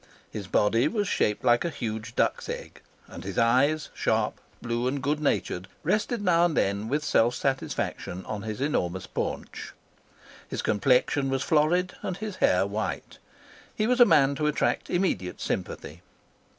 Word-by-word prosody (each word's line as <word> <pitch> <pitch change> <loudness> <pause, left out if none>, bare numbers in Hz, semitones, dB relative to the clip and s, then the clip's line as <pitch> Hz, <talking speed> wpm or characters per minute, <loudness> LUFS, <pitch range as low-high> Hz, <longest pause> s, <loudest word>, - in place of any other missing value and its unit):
His 100 -3 -6
body 115 +7 +3
was 205 +2 -1
shaped 105 - 0
like 120 -1 +4
a 170 - -1
huge 115 -5 -5
duck's - - 0
egg; - - -7 0.3
and - - -9
his 95 0 -6
eyes, 135 +7 +3
sharp, - - 0 0.2
blue, 120 +1 -2
and 140 +2 -1
good 145 +3 0
natured, 95 -10 -1 0.2
rested 210 +5 0
now 170 -3 +4
and 175 -3 +1
then 100 +3 0
with 150 +3 0
self 120 -4 +3
satisfaction 130 -8 -2
on 105 -1 -4
his 110 +2 -5
enormous 95 - -1
paunch. - - -5 0.8
His - - -3
complexion 130 +4 +2
was 135 +1 0
florid 170 +4 +2
and 185 - -3
his 210 -2 -5
hair 90 +1 +3
white. 105 +2 -4 0.6
He 215 - 0
was 250 +2 +2
a 245 - +10
man 145 -7 +4
to 150 - 0
attract 150 - 0
immediate 175 - -1
sympathy. 80 +4 -4
135 Hz, 160 wpm, -27 LUFS, 110-160 Hz, 0.8 s, a